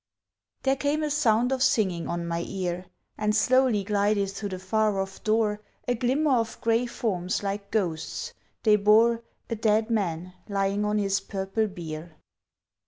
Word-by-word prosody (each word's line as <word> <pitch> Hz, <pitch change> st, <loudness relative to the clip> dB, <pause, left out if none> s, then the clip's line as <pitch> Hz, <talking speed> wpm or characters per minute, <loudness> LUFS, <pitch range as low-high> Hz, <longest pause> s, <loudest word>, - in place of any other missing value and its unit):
There 270 Hz, 0 st, +3 dB
came 290 Hz, +3 st, 0 dB
a 300 Hz, -, -1 dB
sound 245 Hz, -4 st, +3 dB
of 265 Hz, -1 st, 0 dB
singing 185 Hz, -10 st, +2 dB
on 170 Hz, 0 st, -3 dB
my 170 Hz, 0 st, -2 dB
ear, 180 Hz, -1 st, -3 dB, 0.3 s
And 210 Hz, 0 st, +1 dB
slowly 250 Hz, -2 st, +3 dB
glided 200 Hz, -1 st, +1 dB
through 200 Hz, +1 st, -5 dB
the 185 Hz, -, -4 dB
far 205 Hz, +2 st, +1 dB
off 195 Hz, 0 st, -5 dB
door 215 Hz, -1 st, +1 dB, 0.3 s
A 245 Hz, -, +2 dB
glimmer 260 Hz, +4 st, +2 dB
of 230 Hz, -1 st, -2 dB
grey 230 Hz, +2 st, +1 dB
forms 185 Hz, -6 st, -2 dB
like 200 Hz, 0 st, -3 dB
ghosts, 175 Hz, -7 st, -2 dB, 0.3 s
they 215 Hz, -2 st, +5 dB
bore 225 Hz, +3 st, +4 dB, 0.3 s
A -, -, +1 dB
dead 220 Hz, +1 st, +1 dB
man 180 Hz, -4 st, -1 dB, 0.2 s
lying 200 Hz, +1 st, 0 dB
on 210 Hz, 0 st, +1 dB
his 195 Hz, -1 st, +1 dB
purple 195 Hz, +2 st, -2 dB
bier. 165 Hz, -3 st, -8 dB
210 Hz, 160 wpm, -26 LUFS, 190-230 Hz, 0.3 s, they